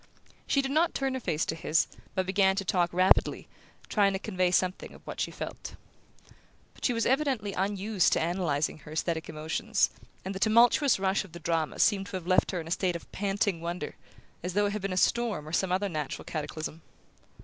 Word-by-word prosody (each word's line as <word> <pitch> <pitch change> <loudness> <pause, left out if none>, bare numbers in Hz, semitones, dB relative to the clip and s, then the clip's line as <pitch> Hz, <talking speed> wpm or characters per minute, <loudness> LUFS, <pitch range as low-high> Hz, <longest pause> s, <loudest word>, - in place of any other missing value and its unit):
She 275 - +2
did 270 - -2
not 320 +4 +2
turn 270 -1 0
her 260 - -2
face 160 -9 -1
to - - -2
his, 160 0 +1 0.3
but 185 - +1
began 190 0 +3
to 195 0 -2
talk 175 0 +1
rapidly, 185 +2 +3 0.4
trying 200 -2 +3
to - - 0
convey 185 -3 0
something 185 +1 0
of - - -17
what - - -5
she - - 0
felt. - - -7 1.0
But - - -18
she - - +3
was 230 -1 0
evidently 260 -7 +1
unused 195 0 +1
to - - +2
analyzing 160 -4 0
her 150 +1 -12
aesthetic 160 0 -2
emotions, 160 +7 0 0.3
and 190 - -3
the 190 - -5
tumultuous 235 +6 +5
rush 190 +1 +1
of 185 -5 -15
the 170 - -8
drama 160 -1 -1
seemed 195 -2 +3
to 200 - -6
have 180 - -9
left 185 0 +3
her 180 - -2
in 160 - -7
a - - -7
state 180 0 0
of 170 - -8
panting 195 -3 -1
wonder, 170 -2 -4 0.5
as 180 +1 -4
though 205 0 +3
it 200 - -1
had 210 - -3
been 195 0 -2
a 185 - -2
storm 210 -7 +1
or 155 - -8
some 190 +1 +1
other 190 +2 +1
natural 155 -6 -4
cataclysm. 155 +1 -5
190 Hz, 210 wpm, -29 LUFS, 170-205 Hz, 1.0 s, tumultuous